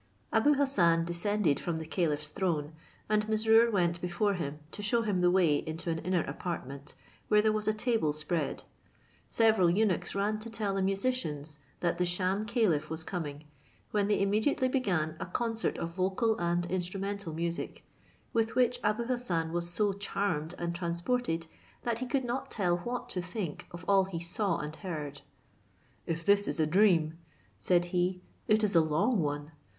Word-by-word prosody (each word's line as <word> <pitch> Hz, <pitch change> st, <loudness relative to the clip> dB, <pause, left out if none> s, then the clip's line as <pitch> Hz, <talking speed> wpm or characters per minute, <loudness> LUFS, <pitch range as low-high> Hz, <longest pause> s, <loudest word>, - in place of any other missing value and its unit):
Abou 285 Hz, +7 st, +4 dB
Hassan 175 Hz, -13 st, +3 dB
descended 175 Hz, -2 st, +1 dB
from 170 Hz, -2 st, -2 dB
the 160 Hz, -, -5 dB
caliph's 150 Hz, -2 st, 0 dB
throne, 160 Hz, -6 st, -1 dB, 0.3 s
and 210 Hz, 0 st, +1 dB
Mesrour 225 Hz, +2 st, +5 dB
went 175 Hz, -5 st, +1 dB
before 180 Hz, +4 st, 0 dB
him, 150 Hz, -5 st, -4 dB
to -, -, -5 dB
shew 230 Hz, +3 st, +2 dB
him 200 Hz, -5 st, 0 dB
the 180 Hz, -, +5 dB
way 175 Hz, -5 st, +4 dB
into 165 Hz, +3 st, -4 dB
an 160 Hz, -, -2 dB
inner 180 Hz, 0 st, 0 dB
apartment, 140 Hz, -5 st, -5 dB, 0.3 s
where 210 Hz, -, +5 dB
there 215 Hz, +1 st, +4 dB
was 215 Hz, 0 st, -2 dB
a -, -, +5 dB
table 215 Hz, -7 st, +1 dB
spread; 150 Hz, +3 st, -2 dB, 0.7 s
several 220 Hz, -6 st, +4 dB
eunuchs 195 Hz, 0 st, +1 dB
ran 210 Hz, +2 st, 0 dB
to 225 Hz, +2 st, -6 dB
tell 215 Hz, -3 st, -2 dB
the 195 Hz, -, 0 dB
musicians 190 Hz, -, -1 dB, 0.2 s
that 170 Hz, 0 st, 0 dB
the 180 Hz, -, +3 dB
sham 185 Hz, +4 st, +1 dB
caliph 190 Hz, -11 st, +1 dB
was 160 Hz, 0 st, -4 dB
coming, 155 Hz, -5 st, -5 dB, 0.5 s
when 205 Hz, -1 st, +1 dB
they 210 Hz, -, +2 dB
immediately 215 Hz, +7 st, +2 dB
began 180 Hz, -, 0 dB
a -, -, -3 dB
concert 225 Hz, +4 st, -1 dB
of 165 Hz, -, -3 dB
vocal 190 Hz, +6 st, +1 dB
and 175 Hz, 0 st, 0 dB
instrumental 195 Hz, +1 st, -2 dB
music, 170 Hz, +2 st, -4 dB, 0.5 s
with 225 Hz, -1 st, +1 dB
which 245 Hz, -1 st, +3 dB
Abou 215 Hz, +3 st, +1 dB
Hassan 210 Hz, -10 st, -1 dB
was 175 Hz, 0 st, -1 dB
so 200 Hz, +4 st, +1 dB
charmed 190 Hz, -5 st, -2 dB
and 170 Hz, 0 st, -2 dB
transported, 170 Hz, +2 st, -1 dB, 0.4 s
that 235 Hz, -1 st, -1 dB
he 255 Hz, -, -3 dB
could 260 Hz, +1 st, 0 dB
not 260 Hz, +3 st, -3 dB
tell 175 Hz, -4 st, 0 dB
what 245 Hz, +6 st, -4 dB
to 180 Hz, -, 0 dB
think 180 Hz, -3 st, -5 dB
of 175 Hz, +1 st, -9 dB
all 195 Hz, -1 st, +5 dB
he 185 Hz, -3 st, -5 dB
saw 180 Hz, +5 st, -1 dB
and 150 Hz, +1 st, -5 dB
heard. 150 Hz, -7 st, -5 dB, 0.9 s
"If 165 Hz, 0 st, -3 dB
this 200 Hz, 0 st, +4 dB
is -, -, -1 dB
a 155 Hz, -, +4 dB
dream," 165 Hz, -2 st, +3 dB, 0.4 s
said 175 Hz, -, +2 dB
he, 180 Hz, 0 st, 0 dB, 0.2 s
"it 215 Hz, +1 st, +4 dB
is 200 Hz, -3 st, +2 dB
a 165 Hz, -, +7 dB
long 190 Hz, +9 st, +1 dB
one. 145 Hz, -1 st, -2 dB
185 Hz, 175 wpm, -30 LUFS, 165-215 Hz, 0.9 s, a